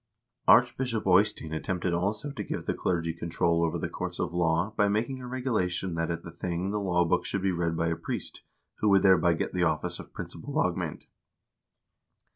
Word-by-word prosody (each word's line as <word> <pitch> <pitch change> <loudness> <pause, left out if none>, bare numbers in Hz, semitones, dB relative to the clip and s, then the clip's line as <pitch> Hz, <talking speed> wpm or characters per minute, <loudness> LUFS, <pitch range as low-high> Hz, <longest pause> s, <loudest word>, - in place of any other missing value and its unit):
Archbishop 120 0 +4
Eystein 95 -4 +3
attempted 90 +2 -1
also 105 +10 -1
to 140 - -5
give - - -4
the - - 0
clergy 85 -2 -1
control 85 0 0
over 85 +1 0
the - - -2
courts - - -5
of - - -2
law 85 +4 +1
by 105 -1 +3
making 115 +6 -1
a 125 - -7
regulation 110 -9 -1
that 80 0 -1
at 85 - -3
the 85 - -8
thing 90 +3 -3
the 105 - -1
law 90 -3 +2
book 80 - +1
should 100 - -3
be 95 - +2
read 85 -2 -1
by 85 0 +1
a 85 - 0
priest, - - -5 0.4
who 105 - +2
would 100 -1 +5
thereby 90 -3 +5
get - - -3
the 90 - 0
office 80 -3 0
of - - -10
principal - - -7
lagmand. - - -1
90 Hz, 195 wpm, -28 LUFS, 85-105 Hz, 0.4 s, would